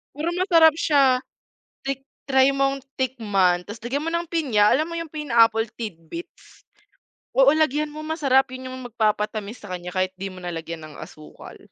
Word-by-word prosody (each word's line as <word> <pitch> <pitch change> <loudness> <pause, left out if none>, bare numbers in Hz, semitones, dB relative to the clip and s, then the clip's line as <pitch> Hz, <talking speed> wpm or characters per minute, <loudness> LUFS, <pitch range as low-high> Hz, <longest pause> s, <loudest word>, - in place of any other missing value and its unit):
Pero 310 +4 -2
masarap 335 -4 +5
siya, 275 -5 +3 0.6
tik 270 -1 -2 0.2
try 265 0 +4
mong 275 0 0 0.2
tikman 205 -9 +1
tas' 205 +4 -9
lagyan 270 +5 -2
mo 330 - -1
ng 340 0 -1
pinya, 275 -11 +2
alam 310 +4 +1
mo 335 - -4
yung 330 - -4
pineapple 230 -6 +3
tidbits? 215 - -9 0.7
Oo, 270 +1 +6
lagyan 305 -1 +1
mo, 305 - -9
masarap 275 -4 +2
'yon. 255 0 -7
Yung 255 -1 -7
magpapatamis 215 -1 -1
sa 205 - -10
kanya 180 0 -7
kahit 185 0 -1
'di 195 +1 -5
mo 185 - -11
na 175 -1 -5
lagyan 165 -1 -6
ng 150 - -13
asukal. 155 0 -12
255 Hz, 170 wpm, -23 LUFS, 205-300 Hz, 0.7 s, Oo